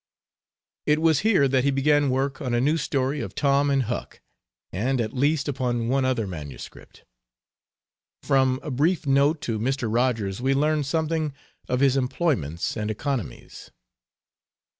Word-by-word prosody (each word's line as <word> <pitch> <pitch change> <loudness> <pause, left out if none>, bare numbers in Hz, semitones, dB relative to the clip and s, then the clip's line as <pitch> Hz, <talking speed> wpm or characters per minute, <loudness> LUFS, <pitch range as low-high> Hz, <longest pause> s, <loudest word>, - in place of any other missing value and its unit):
It 150 0 +3
was 160 -2 +3
here 195 -9 +3
that 130 -1 +1
he 140 - +2
began 145 +1 +2
work 135 +1 -1
on 125 -3 -1
a - - +2
new 145 +6 +2
story 140 -2 -1
of - - -7
Tom 140 0 +2
and 135 -1 +2
Huck, 120 +1 -5 0.5
and 125 +7 0
at 110 -1 -2
least 145 +3 +1
upon 125 -4 -1
one 135 0 +1
other 125 -4 0
manuscript. 75 -7 -10 1.2
From 130 -1 +2
a 150 - -5
brief 155 +6 +1
note 140 +3 +2
to 110 -2 -2
Mr. 130 +1 -1
Rogers 115 -5 0
we 135 +1 +1
learn 150 +1 +1
something 155 +1 -1 0.4
of 125 +1 0
his 135 -1 +4
employments 125 - -1
and 105 -1 -3
economies. 130 +1 -5
135 Hz, 150 wpm, -24 LUFS, 125-145 Hz, 1.2 s, his